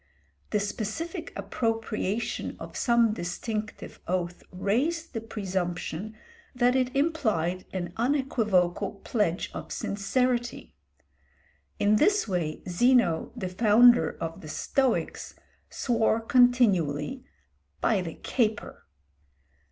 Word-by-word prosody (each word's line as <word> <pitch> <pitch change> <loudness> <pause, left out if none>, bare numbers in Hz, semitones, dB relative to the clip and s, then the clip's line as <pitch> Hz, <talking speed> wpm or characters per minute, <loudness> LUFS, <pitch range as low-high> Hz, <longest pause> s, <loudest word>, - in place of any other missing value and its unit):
The 210 - +1
specific 325 - -4
appropriation 225 -2 -2
of - - -9
some 235 -3 +3
distinctive 210 +4 -5
oath 175 -1 -2
raised 260 - -1
the 225 - -3
presumption 190 -1 -4 0.4
that 245 +1 +3
it 255 0 0
implied 215 - 0
an 175 -2 -4
unequivocal 225 -10 +1
pledge 200 -7 0
of - - -7
sincerity. 240 +4 -1 1.0
In 210 +1 +3
this 410 - +3
way 170 -5 -2
Zeno, 185 -3 +3
the 205 -7 -3
founder 220 -1 +5
of 165 0 -5
the 155 - -9
Stoics, 260 - -1 0.3
swore 230 -2 +1
continually 225 - +3 0.6
"by 210 -4 +2
the 165 -3 -6
caper." 220 -4 -2
215 Hz, 95 wpm, -27 LUFS, 180-245 Hz, 1.0 s, founder